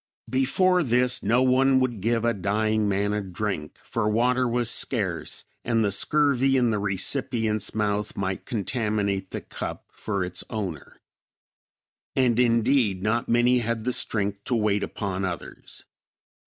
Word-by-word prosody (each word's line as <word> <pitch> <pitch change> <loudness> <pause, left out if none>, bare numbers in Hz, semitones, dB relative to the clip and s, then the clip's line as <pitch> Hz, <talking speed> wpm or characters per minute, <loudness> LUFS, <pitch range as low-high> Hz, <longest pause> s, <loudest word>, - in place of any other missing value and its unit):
Before 180 +8 +3
this, 125 -2 +2
no 125 +3 +2
one 130 +1 +4
would 120 -6 -1
give 115 +2 0
a 120 - +2
dying 105 +2 0
man 100 +1 0
a 105 - -1
drink, 95 -4 -4
for 110 -2 -1
water 125 +3 +2
was 120 0 0
scarce, - - -1 0.2
and 115 -2 +1
the 100 - +1
scurvy 135 +3 +3
in 120 -2 +2
the 105 - 0
recipient's 105 +1 -1
mouth 105 -1 -1
might 95 -1 -2
contaminate 105 -4 -2
the - - -5
cup - - -6
for 100 -3 -3
its 90 0 -2
owner. 95 -9 -5 1.2
And 125 -3 +2
indeed, 115 -4 +2
not 115 +2 0
many 120 +1 +4
had 115 -1 -2
the 125 +2 0
strength 100 -3 -1
to 125 - 0
wait 105 -2 +1
upon 95 -2 -3
others. 90 -4 -6
110 Hz, 145 wpm, -25 LUFS, 100-125 Hz, 1.2 s, one